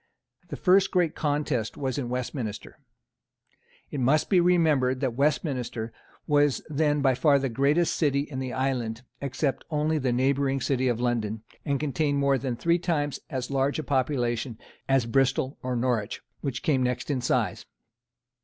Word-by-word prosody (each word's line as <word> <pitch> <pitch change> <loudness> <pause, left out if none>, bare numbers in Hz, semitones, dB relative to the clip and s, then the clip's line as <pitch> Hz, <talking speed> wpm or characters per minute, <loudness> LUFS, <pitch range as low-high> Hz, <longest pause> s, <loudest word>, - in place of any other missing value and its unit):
The - - -4
first 195 +1 +4
great 175 -4 +1
contest 145 -6 -1
was 135 0 -2
in 125 -3 -3
Westminster. 125 -3 -4 1.1
It 145 - -3
must 140 - +2
be 185 - +6
remembered 155 -8 +3
that 130 -3 -1
Westminster 125 -5 -1 0.3
was 145 -2 +2
then 150 -1 +1
by 135 -2 +4
far 140 +2 +4
the 135 -1 -1
greatest 145 +7 +2
city 140 -3 +2
in 140 -2 -5
the 130 -1 -3
island, 125 -3 -2 0.2
except 140 0 -1
only 155 0 +1
the 130 -3 0
neighbouring 135 +2 +1
city 130 -1 0
of 120 -2 0
London, 115 -3 -1 0.2
and 140 -3 0
contained 145 0 0
more 140 -1 +2
than 125 -1 -2
three 170 +8 +1
times 150 -5 -1
as 130 0 -4
large 135 +1 +1
a 155 - -3
population 125 -4 -1 0.3
as 135 -3 +3
Bristol 135 +2 +1
or 125 0 -2
Norwich, 120 -3 -1 0.2
which 135 -3 -4
came 140 -4 +2
next 125 +3 -1
in 130 -3 -1
size. 120 -6 -1
135 Hz, 160 wpm, -27 LUFS, 125-145 Hz, 1.1 s, be